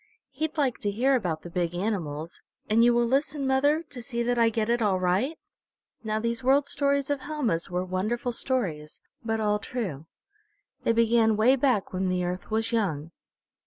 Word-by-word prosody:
He'd 310 +4 -3
like 270 -5 +1
to 205 - -1
hear 255 +7 +2
about 175 -10 -2
the 175 - -8
big 175 -1 -1
animals. 170 -5 -3 0.3
And 225 +2 +4
you 240 - +6
will 240 0 +3
listen, 275 +3 0
mother, 285 +4 +2
to 280 -6 -9
see 235 -1 -2
that 245 0 0
I 230 -1 +5
get 220 -1 -1
it 235 0 +1
all 195 -4 +2
right?" 195 - 0 0.7
Now 215 -1 -1
these 235 +2 -2
World 270 +2 +4
Stories 280 0 0
of 285 - 0
Helma's 260 - -2
were 180 +1 -2
wonderful 215 +7 -2
stories, 185 - -2 0.2
but 225 -1 -1
all 210 -1 +1
true. 185 - -5 0.8
They - - +4
began 230 -1 +3
way 240 +5 +5
back 250 -8 +1
when 185 0 0
the 180 0 0
Earth 180 +1 -4
was 225 +1 0
young. 170 -9 -1
230 Hz, 185 wpm, -27 LUFS, 185-260 Hz, 0.8 s, you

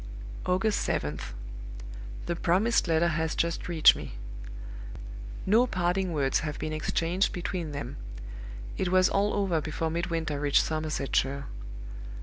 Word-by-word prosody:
"August 190 +4 +3
7th. 75 0 -1 0.9
The 170 - 0
promised 190 +7 +3
letter 165 +1 +4
has 160 0 0
just 170 -1 0
reached 165 -3 +7
me. - - -6 1.3
No 225 +6 +5
parting 180 -1 +1
words 140 -4 +2
have 150 -1 -3
been 155 - -2
exchanged 165 +4 +1
between 175 -2 -3
them: 140 -3 -5 0.8
it 185 - +1
was 185 0 +5
all 200 +1 +3
over 190 -6 +2
before 160 +1 -1
Midwinter 165 -3 -1
reached 145 -1 +4
Somersetshire. 140 -3 0
165 Hz, 125 wpm, -29 LUFS, 155-185 Hz, 1.3 s, reached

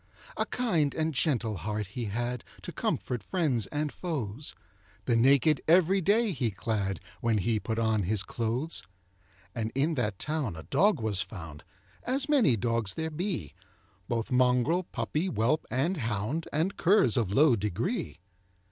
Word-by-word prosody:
A - - -1
kind 170 - 0
and 160 0 0
gentle 120 -7 0
heart 105 +4 -3
he 115 +5 -5
had, 120 +3 -3 0.2
To - - -6
comfort 120 -3 -2
friends 135 - 0
and 150 0 -2
foes; 140 - -4 0.5
The 120 - +2
naked 140 +4 +4
every 185 +3 +5
day 210 +4 +3
he 130 -8 0
clad, 100 -1 -2 0.2
When 115 -2 +1
he 110 +3 +1
put 110 +1 -3
on 110 -2 +2
his 100 +1 0
clothes. 120 - -2 0.7
And 110 -2 -3
in 145 +5 +2
that 105 -8 -1
town 150 - -2
a 80 - -8
dog 200 -4 +3
was 105 -4 +1
found, 80 -7 -8 0.4
As 270 +3 -1
many 245 - +4
dogs 115 -2 -1
there 160 0 -3
be, 165 - -3 0.5
Both 115 +2 -2
mongrel, 125 +8 +3
puppy, 150 +8 -2
whelp, 150 - 0
and 140 +10 0
hound, 115 +5 -2
And 165 +7 0
curs 175 - +4
of 110 -6 +1
low 140 +3 +5
degree. 105 -4 -2
125 Hz, 155 wpm, -29 LUFS, 110-160 Hz, 0.7 s, every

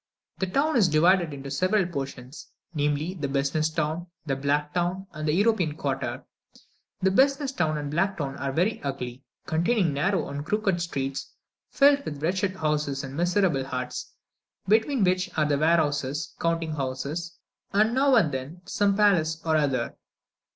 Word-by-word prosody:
The 190 - 0
town 280 +8 +1
is 205 -6 +5
divided 170 +2 +4
into 140 -1 -7
several 185 +6 +2
portions 135 -4 -6 0.3
namely, 150 +3 0
the 155 -7 -3
Business 140 +3 0
town, 160 +2 -2 0.2
the 135 -3 0
Black 145 +2 0
town, 180 +3 -1
and 155 -1 -4
the - - +3
European 185 -5 +2
quarter. - - -3 0.8
The 190 0 +3
Business 275 +5 +3
town 160 - 0
and 145 -1 -4
Black 190 +5 0
town 140 -3 -3
are 140 -1 -2
very 180 +10 0
ugly, 130 -2 -5 0.2
containing 170 +1 +1
narrow, 145 -2 -1
crooked 195 +2 0
streets, 135 -5 -3 0.4
filled 280 0 +4
with 145 - -6
wretched 185 +3 0
houses 150 -4 -1
and 135 0 -7
miserable 175 -4 +2
huts, 125 -1 -5 0.6
between 220 +4 +3
which 185 0 +1
there 155 - +2
are 145 -1 +1
warehouses, 150 -2 +1
counting 165 -1 0
houses, 140 +5 -4 0.3
and 215 +3 +3
now 270 +1 +4
and 170 -11 +4
then 135 +7 -6
some 200 0 +1
palace 170 -7 +3
or 160 -1 +2
other. 135 -6 0
160 Hz, 155 wpm, -26 LUFS, 145-190 Hz, 0.8 s, is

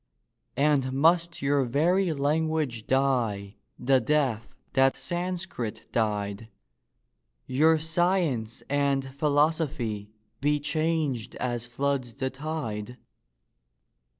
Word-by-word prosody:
And 140 -3 +2
must 165 +3 +2
your 140 0 +3
very 170 +9 +2
language 150 -4 0
die 115 -7 0 0.2
the 130 +1 +3
death 125 -3 +1 0.3
that 135 -1 +4
Sanscrit 175 - -4
died— 105 -1 -1 1.0
Your 160 +5 +4
science 160 - 0
and 140 -1 +1
philosophy 145 -7 0 0.3
be 145 +1 +2
changed 150 -6 -1
as 120 -1 -3
floods 130 -1 -2
the 130 -1 -2
tide? 125 -6 -5
140 Hz, 90 wpm, -27 LUFS, 120-155 Hz, 1.0 s, that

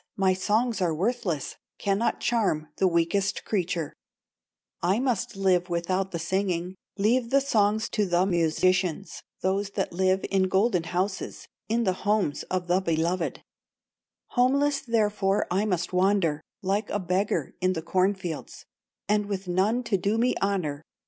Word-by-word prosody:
my 190 -1 +3
songs 215 +4 0
are 170 -3 +1
worthless, 185 - -2 0.2
Cannot 200 +3 0
charm 195 -10 0
the 190 - +3
weakest 180 +3 0
creature; 175 -6 -1 0.9
I 185 +4 +2
must 245 -8 -1
live 185 -2 +2
without 185 +3 -1
the 170 - -4
singing, 180 +1 -1 0.2
Leave 230 +4 +2
the 275 - +4
songs 220 -5 +2
to 210 -2 0
the 175 +1 +2
musicians, 185 +1 +1 0.2
Those 195 +2 0
that - - -1
live 190 +1 +1
in 190 -1 +3
golden 190 -2 +2
houses, 190 +3 -3 0.2
In 230 +2 +1
the 190 -4 +2
homes 205 -7 +1
of 185 -1 -1
the 180 +1 +2
beloved; 170 0 -1 0.9
Homeless 275 +3 +2
therefore 210 -4 +1
I 195 +4 +2
must 180 -4 -1
wander, 180 -5 +2 0.2
Like 200 +3 0
a - - 0
beggar 185 +2 -1
in 185 0 +2
the 160 -2 -4
corn 185 +4 +2
fields, 175 -4 -7 0.4
And 210 -1 +1
with 195 -2 -4
none 200 +7 +1
to 225 -4 +1
do 200 +4 0
me 245 +2 +2
honor. 180 -8 -1
190 Hz, 150 wpm, -26 LUFS, 180-210 Hz, 0.9 s, the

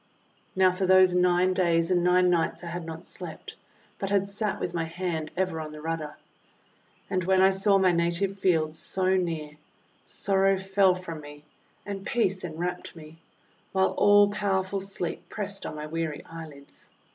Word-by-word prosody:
Now 185 -1 +5
for 185 +1 -1
those 185 -1 +6
nine 180 +1 +3
days 170 -2 +2
and 175 -1 +3
nine 180 0 +4
nights 170 +1 0
I 170 - -5
had 170 0 -5
not 165 0 -7
slept, - - -9 0.4
but 195 - -2
had 200 -1 +2
sat 205 +1 -2
with 175 - -3
my 165 -1 -1
hand 165 -2 -3
ever 185 -4 -1
on 155 -1 -7
the 155 - -9
rudder. 160 -1 -4 0.9
And 185 -2 -1
when 190 +1 +3
I 190 +1 +6
saw 195 +1 +3
my 190 -1 +4
native 175 +3 0
fields 160 -4 +1
so 190 0 +1
near, 165 -5 -2 0.6
sorrow 195 0 +1
fell 190 0 +3
from 170 -4 -7
me 145 0 -12 0.4
and 200 -1 -5
peace 195 -4 0
enwrapped 175 +2 -4
me, 160 0 -13 0.5
while 190 0 +3
all 205 0 +5
powerful 195 -2 -1
Sleep 190 -3 -5
pressed 200 -1 -4
on - - -6
my 150 0 -5
weary 160 -1 -4
eyelids. 155 -4 -9
180 Hz, 170 wpm, -27 LUFS, 165-190 Hz, 0.9 s, those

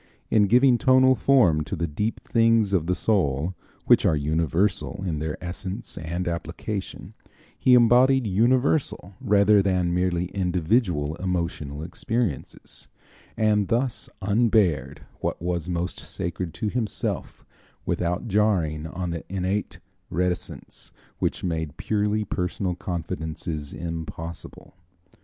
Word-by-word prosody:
In 105 -2 +5
giving 125 +3 +5
tonal 130 -1 +5
form 110 - +4
to 70 - -4
the 85 - -1
deep 105 +9 -2
things 115 -3 +3
of 85 -4 +1
the 90 - +1
soul, 90 -5 +1 0.3
which - - +5
are - - +3
universal 85 +7 0
in 80 -5 -2
their 75 0 -3
essence 95 +4 -5
and 85 +2 -4
application, 85 +4 -5 0.4
he 125 - +5
embodied 125 +2 +5
universal 120 - +1
rather 105 -3 +5
than 90 -3 +1
merely 90 -1 +1
individual 90 - 0
emotional 85 -5 -3
experiences, 110 - -3 0.5
and 105 -2 +2
thus 120 +4 -1
unbared 95 - +2 0.2
what - - -2
was 85 0 -2
most 85 0 -2
sacred 85 0 -4
to 105 - -2
himself 115 -1 -3 0.4
without 90 +5 -1
jarring 90 -8 +1
on 90 +1 -4
the 85 -1 -4
innate 95 +2 -2 0.3
reticence 90 +1 -3 0.3
which - - -1
made 80 -4 -3
purely 105 0 0
personal 90 0 -2
confidences 80 -3 -4
impossible. 85 0 -7
90 Hz, 115 wpm, -25 LUFS, 85-105 Hz, 0.5 s, In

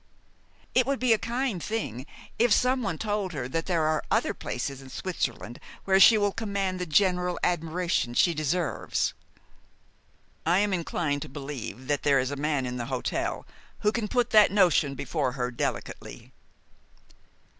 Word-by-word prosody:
"It 250 -1 +3
would 275 0 +1
be 250 -2 +4
a 220 - +1
kind 235 -4 -2
thing 150 - -4 0.3
if 240 0 +4
someone 250 -8 +2
told 205 -3 -2
her 130 -5 -3
that 165 +5 -3
there 170 -4 +1
are 155 0 +1
other - - +1
places 135 +2 -5
in 135 - -12
Switzerland 125 -8 -4 0.3
where 190 0 +4
she 220 +3 +8
will 205 -1 +2
command 200 -4 -2
the 180 - -3
general 180 +1 +2
admiration 170 -6 0
she 170 - +4
deserves." 155 +2 -1 1.3
"I 170 +3 +3
am 205 0 +2
inclined 160 -4 -1
to - - -6
believe 135 -2 -7
that 145 +1 0
there 140 -2 +3
is 130 +1 0
a - - -2
man 145 -2 -1
in 125 0 -4
the 120 - -3
hotel - - -2 0.4
who 210 - +3
can 225 -2 -2
put 245 +1 0
that 215 -2 +7
notion 175 -8 +3
before 140 -1 -2
her 125 -2 -2
delicately." 120 - -5
175 Hz, 160 wpm, -27 LUFS, 140-205 Hz, 1.3 s, she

